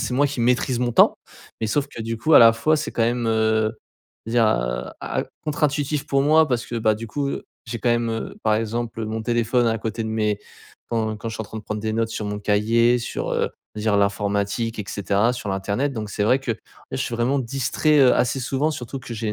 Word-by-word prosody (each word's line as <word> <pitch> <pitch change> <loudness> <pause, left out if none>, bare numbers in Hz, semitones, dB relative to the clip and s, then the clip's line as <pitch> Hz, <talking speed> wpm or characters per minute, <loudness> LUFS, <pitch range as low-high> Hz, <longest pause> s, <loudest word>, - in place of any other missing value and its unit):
c'est 125 - -2
moi 145 +2 +4
qui 140 -3 -4
maîtrise 125 +1 +1
mon 125 -1 +1
temps. - - +5 0.4
Mais, 110 - -1
sauf 145 +5 +1
que, 120 -5 -8
du 115 +1 -3
coup, 155 +7 +3
à - - +10
la 115 -1 +9
fois 155 +8 +2
c'est 155 - -3
quand 115 - 0
même, 120 +1 0
heu 110 -1 +2 0.5
dire 115 0 +3
a - - 0
a - - -2 0.2
contre 150 -1 -3
intuitif 145 0 0
pour 135 0 +2
moi, 155 +1 +5
parce 120 -1 -1
que, - - -6
bah, 110 -1 +2
du 115 +2 -7
coup, 140 +5 -2
heu, - - -5 0.2
j'ai 115 0 -4
quand 120 - 0
même, 120 -1 +1
heu, 115 0 -4
par 110 -1 +3
exemple, 115 +1 -2
heu, 110 - -3
mon 110 +1 -3
téléphone 120 +1 +1
à 115 0 0
côté 115 +1 -3
de 110 - -3
mes 105 -2 0 0.5
quand 110 -2 -1
quand 115 +2 -6
je 110 - -5
suis - - -5
en - - -8
train 110 - -8
de - - -9
prendre 105 0 -4
des 110 0 -2
notes 115 0 0
sur 110 - -4
mon 105 0 -3
cahier, 115 +4 +3
sur, 115 - -4
heu - - 0 0.2
je 105 - -5
veux - - -5
dire 105 -2 +2
l'informatique 100 +3 0
et 105 - -3
cetera, 100 +3 +1
sur 120 -4 -6
l'internet. 100 +9 -1
Donc, 110 -3 -5
c'est 105 - -2
vrai 125 +5 +4
que, 130 -3 -1
ouais, - - -9 0.3
je - - -1
suis 120 - -2
vraiment 120 +4 +1
distrait, 135 +4 +1
heu, 130 -3 +6
assez 125 +2 +1
souvent, 135 +5 0
surtout 135 -1 -5
que 125 - -8
j'ai 110 0 -4
les 105 - 0
115 Hz, 260 wpm, -23 LUFS, 110-125 Hz, 0.5 s, à